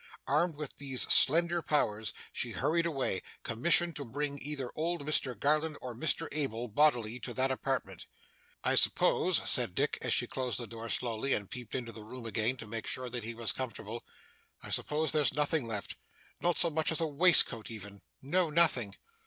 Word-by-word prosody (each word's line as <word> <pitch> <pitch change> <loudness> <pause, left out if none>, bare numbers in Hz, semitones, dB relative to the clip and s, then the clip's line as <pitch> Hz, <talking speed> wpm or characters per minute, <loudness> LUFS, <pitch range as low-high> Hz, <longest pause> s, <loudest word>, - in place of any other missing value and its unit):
Armed 155 +4 +1
with 150 -2 -6
these 135 -3 0
slender 170 +4 +5
powers, 110 -9 -1 0.2
she - - -3
hurried 165 +6 +1
away, 135 - -2 0.2
commissioned 170 +8 +2
to 145 - -4
bring 140 +3 -4
either 140 -4 -5
old 165 -1 -2
Mr 130 -6 -1
Garland 150 +2 +1
or 125 -1 -7
Mr 135 +6 -1
Abel, 125 -6 -3
bodily, 120 -2 +2
to 120 -1 -6
that 130 +1 +1
apartment. 130 -1 -3 0.6
'I - - +2
suppose,' - - +3
said - - +5
Dick, - - 0
as - - -2
she - - +3
closed 125 -4 -3
the 120 - -5
door 115 +1 -8
slowly, 120 +3 0
and 100 -2 -6
peeped 125 -3 -7
into 120 -3 -4
the 110 -2 -11
room 120 +2 -10
again, 115 +3 -1
to 115 - -8
make 115 +1 -6
sure 130 -1 -3
that 120 -2 -4
he 115 +1 -6
was 115 -1 -2
comfortable, 120 -2 -6 0.6
'I - - -8
suppose 155 0 -1
there's 150 -2 +2
nothing 150 -3 +1
left 105 -3 -3 0.5
not 175 -1 +1
so 170 - +1
much 160 +1 0
as 160 - +1
a 165 - +1
waistcoat 150 -7 +5
even?' 105 -3 -9 0.2
'No, 170 +5 +2
nothing. 150 -10 +2
130 Hz, 185 wpm, -31 LUFS, 115-155 Hz, 0.6 s, slender